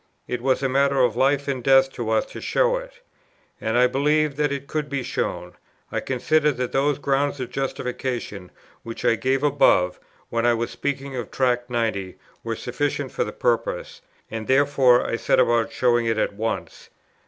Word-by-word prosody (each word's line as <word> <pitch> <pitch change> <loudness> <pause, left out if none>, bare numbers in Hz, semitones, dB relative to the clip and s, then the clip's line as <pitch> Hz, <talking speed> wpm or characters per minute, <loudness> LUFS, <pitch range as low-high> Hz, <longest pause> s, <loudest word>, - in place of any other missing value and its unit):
It 125 -1 -3
was 130 +1 +1
a - - +3
matter 140 +1 +2
of 125 -4 +3
life 140 +3 +2
and 130 -3 -2
death 135 0 +5
to 115 -2 -4
us 110 -1 +2
to - - -8
show - - +2
it. - - -10 0.6
And 110 +2 0
I 125 - +6
believed 150 +3 +1
that 150 -1 +1
it 140 -1 -4
could 150 0 -3
be 140 -2 -2
shown; - - -3 0.4
I - - -1
considered 150 +2 +1
that 125 -1 -2
those 140 +1 +1
grounds 140 0 0
of 125 -1 -5
justification, 125 -7 -4 0.3
which 115 0 -7
I - - +5
gave 130 +4 0
above, 135 -11 +3 0.3
when 115 0 -1
I 120 0 +4
was 115 +1 -3
speaking 135 +2 -4
of 120 -4 -4
Tract 125 -1 0
90, 110 -6 -2 0.3
were 115 0 -3
sufficient 135 +3 -3
for - - -1
the - - -5
purpose; 120 -2 -2 0.3
and 110 -1 -5
therefore 135 -2 +4
I 115 - -1
set - - +2
about 120 -2 +2
showing 120 -2 +2
it 115 -1 +1
at 110 - 0
once. 110 +2 -4
130 Hz, 185 wpm, -23 LUFS, 120-140 Hz, 0.6 s, I